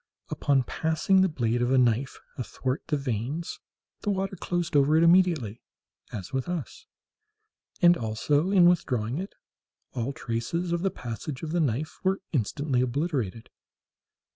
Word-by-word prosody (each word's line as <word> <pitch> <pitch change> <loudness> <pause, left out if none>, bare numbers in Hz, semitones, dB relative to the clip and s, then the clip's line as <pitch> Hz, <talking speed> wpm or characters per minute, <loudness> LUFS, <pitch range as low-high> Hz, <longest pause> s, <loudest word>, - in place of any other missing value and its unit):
Upon 140 -2 +2
passing 160 +7 +2
the 190 - +3
blade 120 -5 0
of 120 - +1
a 135 - +3
knife 125 +2 +2 0.2
athwart 130 +1 -3
the 150 - +1
veins, 135 +5 -3 0.4
the 205 - -3
water 195 -1 -1
closed 175 -2 -2
over 145 +2 +5
it 165 - +5
immediately, 165 - +3 0.5
as 95 +1 -7
with 130 +4 -2
us, 180 - -5 1.0
and 175 0 +8
also, 145 +8 0
in 185 -3 +6
withdrawing 130 -7 +1
it, 195 +2 -6 0.6
all 125 +1 -2
traces 135 +8 -3
of 170 0 0
the 195 - +2
passage 125 0 -6
of 155 - -3
the 175 - +1
knife 145 0 -1
were 190 +1 +1
instantly 135 0 0
obliterated. 125 - -2
145 Hz, 145 wpm, -27 LUFS, 120-175 Hz, 1.0 s, and